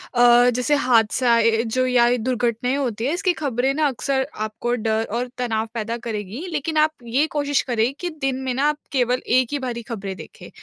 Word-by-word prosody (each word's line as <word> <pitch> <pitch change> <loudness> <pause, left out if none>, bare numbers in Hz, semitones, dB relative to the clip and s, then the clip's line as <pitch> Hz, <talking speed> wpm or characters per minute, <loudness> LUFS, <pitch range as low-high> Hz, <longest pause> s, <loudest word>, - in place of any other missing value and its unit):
अ, 245 0 +6
जैसे 250 +4 +1
हादसा 240 -2 +3
ए, 225 0 +3
जो 255 +3 0
या 240 -1 +4
ये 245 +1 +2
दुर्घटनाएँ 245 +1 -1
होती 240 -4 -2
हैं, 285 - 0
इसकी 360 0 +1
ख़बरें 270 -3 -1
ना 305 0 +2
अक्सर 265 0 -1
आपको 220 +3 -3
डर 220 -1 0
और 240 +2 -1
तनाव 225 -3 -1
पैदा 230 +1 -3
करेगी, 225 - -5
लेकिन 315 +1 -2
आप 310 0 +4
ये 255 +6 +1
कोशिश 290 -2 0
करें 240 +1 0
कि 355 - -3
दिन 270 -1 0
में 260 - -1
ना 265 +3 -1
आप 300 - -2
केवल 250 -2 +1
एक 255 0 +3
ही 290 - -1
बारी 240 -2 -4
ख़बरें 195 -4 -5
देखें - - -12
245 Hz, 205 wpm, -22 LUFS, 230-270 Hz, -, अ